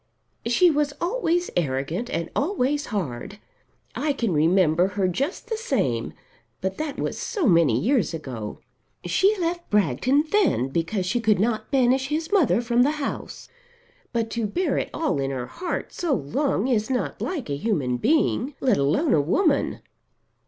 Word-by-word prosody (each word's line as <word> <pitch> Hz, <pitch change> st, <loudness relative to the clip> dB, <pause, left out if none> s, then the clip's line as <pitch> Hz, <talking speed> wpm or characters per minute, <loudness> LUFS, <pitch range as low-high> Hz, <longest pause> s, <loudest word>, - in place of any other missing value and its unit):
"She 335 Hz, +9 st, +5 dB
was 295 Hz, -1 st, 0 dB
always 350 Hz, -3 st, 0 dB
arrogant 155 Hz, -, -1 dB
and 170 Hz, -, -3 dB
always 290 Hz, -3 st, 0 dB
hard. 190 Hz, -, -4 dB, 0.6 s
I 300 Hz, -1 st, 0 dB
can 230 Hz, -8 st, -1 dB
remember 165 Hz, +2 st, +3 dB
her 190 Hz, -2 st, +2 dB
just 275 Hz, -, -2 dB
the 450 Hz, -1 st, -2 dB
same; 130 Hz, -, -1 dB, 0.5 s
but 190 Hz, 0 st, -3 dB
that 305 Hz, -2 st, -3 dB
was -, -, -3 dB
so 410 Hz, -8 st, -2 dB
many 165 Hz, -, +4 dB
years 245 Hz, -, +1 dB
ago. 125 Hz, -10 st, -6 dB, 0.5 s
She 405 Hz, +2 st, +3 dB
left 345 Hz, -1 st, -2 dB
Bragton 210 Hz, -, +2 dB
then 335 Hz, -, +2 dB
because 170 Hz, +6 st, -1 dB
she 235 Hz, +7 st, 0 dB
could 215 Hz, -4 st, +3 dB
not 220 Hz, 0 st, 0 dB
banish 265 Hz, 0 st, +2 dB
his 320 Hz, +4 st, -2 dB
mother 280 Hz, -, +3 dB
from 240 Hz, 0 st, +2 dB
the 285 Hz, +4 st, +3 dB
house. 280 Hz, -, -5 dB, 0.6 s
But 230 Hz, -2 st, -1 dB
to 230 Hz, -2 st, -1 dB
bear 355 Hz, -, 0 dB
it -, -, -3 dB
all 315 Hz, -, -1 dB
in 135 Hz, 0 st, -1 dB
her 130 Hz, -2 st, -3 dB
heart 350 Hz, -, -5 dB
so 330 Hz, -6 st, 0 dB
long 220 Hz, -, -1 dB
is 225 Hz, -4 st, +1 dB
not 255 Hz, -2 st, -2 dB
like 325 Hz, -9 st, -3 dB
a -, -, 0 dB
human 140 Hz, -, -1 dB
being, 285 Hz, -, +1 dB
let 255 Hz, -5 st, +2 dB
alone 150 Hz, -, +2 dB
a 150 Hz, -, +4 dB
woman. 280 Hz, -, +1 dB
235 Hz, 160 wpm, -24 LUFS, -, 0.6 s, She